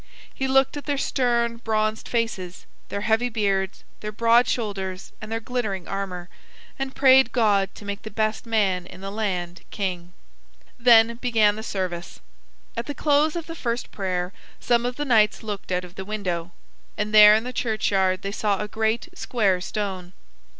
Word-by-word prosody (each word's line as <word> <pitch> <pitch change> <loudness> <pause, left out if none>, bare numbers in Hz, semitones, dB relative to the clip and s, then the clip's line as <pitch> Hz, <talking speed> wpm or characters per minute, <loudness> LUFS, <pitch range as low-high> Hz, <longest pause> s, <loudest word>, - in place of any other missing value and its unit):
He 265 - -2
looked 270 +2 +3
at 290 - -7
their 290 -1 0
stern 235 -3 0
bronzed 220 -1 -1
faces, 210 -7 -3 0.2
their 200 - -3
heavy 225 +3 +1
beards, 195 -4 -1 0.2
their 210 - -5
broad 230 +3 +4
shoulders, 195 -5 -3
and 215 +1 -8
their 225 - -1
glittering 220 -6 -3
armor, 185 -3 -4 0.5
and 270 0 -3
prayed 265 -1 +6
God 205 -5 +2
to 205 - -11
make 200 0 -4
the 220 - -7
best 215 +2 -2
man 195 -5 +1
in 185 0 -12
the 195 0 -5
land 185 -5 -3
king. 180 -3 -4 0.7
Then 230 -1 +6
began 225 -4 +3
the 220 - -6
service. 185 -5 -4 0.6
At 235 - -4
the 290 - -4
close 300 +2 +2
of 335 -2 -3
the 330 - -7
first 240 -6 -3
prayer 185 -2 -2 0.3
some 240 0 +2
of 245 - -4
the 295 - -3
knights 220 -6 +3
looked 205 -3 -6
out 180 0 0
of 175 - -14
the 190 - -6
window, 185 -5 -3 0.5
and 210 +1 -2
there 210 0 +9
in 220 - +1
the 250 +1 -6
churchyard 195 -6 0
they 195 - -3
saw 205 -1 0
a 210 - -3
great 220 +5 -1
square 205 - 0
stone. 190 -3 -4
215 Hz, 175 wpm, -24 LUFS, 190-235 Hz, 0.7 s, there